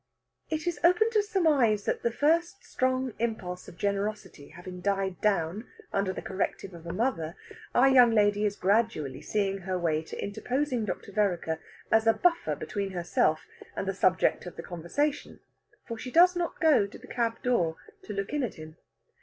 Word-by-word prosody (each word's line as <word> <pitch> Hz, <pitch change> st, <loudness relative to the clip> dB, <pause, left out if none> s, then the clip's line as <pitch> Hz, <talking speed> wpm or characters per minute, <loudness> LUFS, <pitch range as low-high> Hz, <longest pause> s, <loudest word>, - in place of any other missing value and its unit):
It 315 Hz, -1 st, -2 dB
is 345 Hz, -4 st, -2 dB
open 395 Hz, +6 st, +4 dB
to 430 Hz, -2 st, +3 dB
surmise 300 Hz, -, +2 dB
that -, -, -1 dB
the 235 Hz, -, +1 dB
first 335 Hz, -, +1 dB
strong 255 Hz, -1 st, 0 dB
impulse 195 Hz, -6 st, -3 dB
of 170 Hz, -, -12 dB
generosity 200 Hz, -6 st, -3 dB
having 180 Hz, +1 st, -10 dB
died 195 Hz, -1 st, -1 dB
down 200 Hz, +1 st, 0 dB, 0.3 s
under 200 Hz, -1 st, +1 dB
the -, -, -6 dB
corrective 190 Hz, 0 st, -3 dB
of 170 Hz, 0 st, -11 dB
a -, -, -3 dB
mother, 180 Hz, -5 st, -1 dB, 0.4 s
our 255 Hz, +2 st, +6 dB
young 255 Hz, -3 st, +7 dB
lady 205 Hz, -2 st, +3 dB
is 205 Hz, -1 st, +1 dB
gradually 195 Hz, -, 0 dB
seeing 195 Hz, -2 st, -1 dB
her 185 Hz, 0 st, -3 dB
way 160 Hz, -3 st, 0 dB
to 160 Hz, -, -9 dB
interposing 250 Hz, +3 st, -1 dB
Dr. 200 Hz, 0 st, -5 dB
Vereker 180 Hz, -6 st, 0 dB, 0.3 s
as 220 Hz, 0 st, +4 dB
a 225 Hz, -, +7 dB
buffer 345 Hz, +4 st, +1 dB
between 200 Hz, -2 st, -4 dB
herself 170 Hz, -3 st, +1 dB, 0.3 s
and 195 Hz, -, -3 dB
the 195 Hz, -, 0 dB
subject 185 Hz, -1 st, +2 dB
of 175 Hz, -, -8 dB
the 165 Hz, -, -7 dB
conversation, 225 Hz, -, -2 dB, 0.5 s
for 230 Hz, -2 st, -5 dB
she 255 Hz, -, -6 dB
does 355 Hz, +6 st, +6 dB
not 350 Hz, -1 st, -2 dB
go 305 Hz, -, +4 dB
to 200 Hz, -, -12 dB
the -, -, -14 dB
cab 230 Hz, -1 st, -1 dB
door 175 Hz, -11 st, +1 dB, 0.2 s
to 210 Hz, -, -7 dB
look 195 Hz, +5 st, -4 dB
in 295 Hz, -, +1 dB
at 240 Hz, -6 st, -3 dB
him. 155 Hz, 0 st, -11 dB
210 Hz, 180 wpm, -28 LUFS, 180-255 Hz, 0.5 s, young